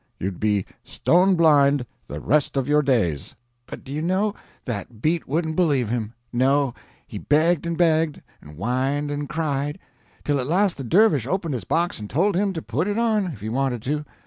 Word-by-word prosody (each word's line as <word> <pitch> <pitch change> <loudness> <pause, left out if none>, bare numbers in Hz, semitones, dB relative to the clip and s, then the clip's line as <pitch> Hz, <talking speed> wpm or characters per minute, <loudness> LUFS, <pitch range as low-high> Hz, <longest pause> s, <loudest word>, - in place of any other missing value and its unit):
You'd 95 -1 -4
be 105 -3 +1 0.2
stone 185 +2 +2
blind 145 -5 +4 0.2
the - - -6
rest 145 0 +1
of 135 -1 0
your 150 +1 +4
days." 110 - 0 0.3
But - - -9
do 135 - -10
you 150 +2 -2
know 190 +5 0 0.3
that 110 -1 -5
beat 160 +7 0
wouldn't 160 +2 -1
believe 145 -10 +2
him. 115 -1 -3 0.2
No, 135 +1 +2 0.3
he - - -7
begged 160 +3 +2
and 170 -1 -2
begged, 160 -3 +2 0.2
and 75 0 -13
whined 135 - -1
and 145 0 -4
cried, 145 -1 -2 0.5
till 145 -1 0
at 125 - -2
last 185 +4 +2
the 135 - -5
dervish 150 - +3
opened 170 -1 -1
his 115 -8 -4
box 170 - 0
and 105 -1 -7
told 185 +6 +1
him 200 +2 +1
to 160 - -5
put 145 - -1
it 205 +1 -1
on, 220 -4 +1
if 135 - -7
he 110 - -4
wanted 125 -1 -1
to. 150 +3 -2
145 Hz, 195 wpm, -23 LUFS, 125-170 Hz, 0.5 s, blind